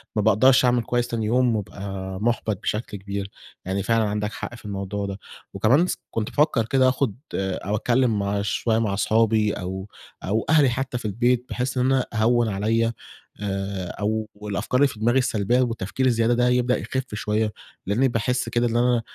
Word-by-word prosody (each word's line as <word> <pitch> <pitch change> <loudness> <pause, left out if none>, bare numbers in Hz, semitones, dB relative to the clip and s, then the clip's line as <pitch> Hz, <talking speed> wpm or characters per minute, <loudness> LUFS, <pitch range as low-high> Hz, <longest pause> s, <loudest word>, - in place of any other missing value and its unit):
ما 105 - +2
باقدَرش 125 +5 +5
أعمل 120 -1 +3
كويس 120 +1 0
تاني 115 -2 -2
يوم 120 +1 +2
وابقى 95 -2 -5
مُحبَط 110 -3 0
بشكل 105 -1 -3
كبير 100 0 -5 0.4
يعني، 95 +1 -1
فعلًا 115 +2 +2
عندك 105 +1 -2
حق 120 - -6
في 115 - -15
الموضوع 100 0 -3
ده، 100 0 -5 0.3
وكمان 140 +11 +3
س - - -2
كنت 110 -1 -2
بافكّر 145 -6 +2
كده 130 +2 +3
آخُد 130 -5 0 0.2
أو 95 +1 -2
أتكلّم 120 0 +2
مع 100 0 -1
شويّة 110 +2 0
مع 110 -4 0
أصحابي 110 +1 +2
أو 95 +1 -5 0.4
أو 110 +3 0
أهلي 150 -4 +5
حتى 125 +1 -2
في 120 - -8
البيت، 120 +4 +1
بحيث 125 +1 -2
إن 125 - +2
أنا 130 -1 +2
أهوّن 115 +1 +3
عليَّ 110 +3 +1 0.5
آآ، 95 -2 -3
أو 110 +1 -1 0.2
الأفكار 105 +4 -1
اللي 145 - +6
في 115 - -9
دماغي 120 +4 +2
السلبيّة 120 0 +1
والتفكير 120 +1 -1
الزيادة 115 -1 +3
ده 125 +1 +2
هيبدأ 125 0 +2
يخِف 130 -4 -4
شويّة، 105 0 -1 0.3
لإنّي 115 +8 +2
باحس 125 +1 -1
كده 120 0 +1
اللي 120 +1 +1
أنا 120 -1 +3
115 Hz, 180 wpm, -24 LUFS, 100-125 Hz, 0.5 s, اللي